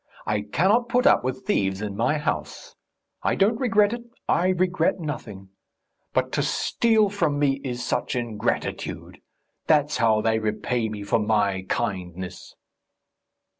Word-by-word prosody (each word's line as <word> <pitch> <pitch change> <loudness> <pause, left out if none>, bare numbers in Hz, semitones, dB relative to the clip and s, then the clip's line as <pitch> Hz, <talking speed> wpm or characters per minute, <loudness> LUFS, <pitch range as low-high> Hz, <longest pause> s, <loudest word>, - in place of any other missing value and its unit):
I 105 -1 0
cannot 210 +8 +3
put 250 +2 +2
up - - +5
with 130 +10 -4
thieves 95 - 0
in 105 -1 -4
my 120 +8 +1
house. 150 - -4 0.5
I - - +1
don't 215 +4 +2
regret 220 -4 +3
it 240 - -4 0.3
I 175 +2 +2
regret 185 -1 +1
nothing; 110 - -6 0.6
but - - 0
to - - 0
steal 225 -2 +2
from 165 -8 0
me 140 -1 +1
is 125 -2 -4
such - - -1
ingratitude! 115 -2 -3 0.5
That's 150 -1 +3
how 110 -2 +3
they 110 0 +1
repay 110 +2 -1
me 105 -1 -6
for 100 - +1
my 100 -3 0
kindness...." 90 -1 -4
125 Hz, 140 wpm, -24 LUFS, -, 0.6 s, up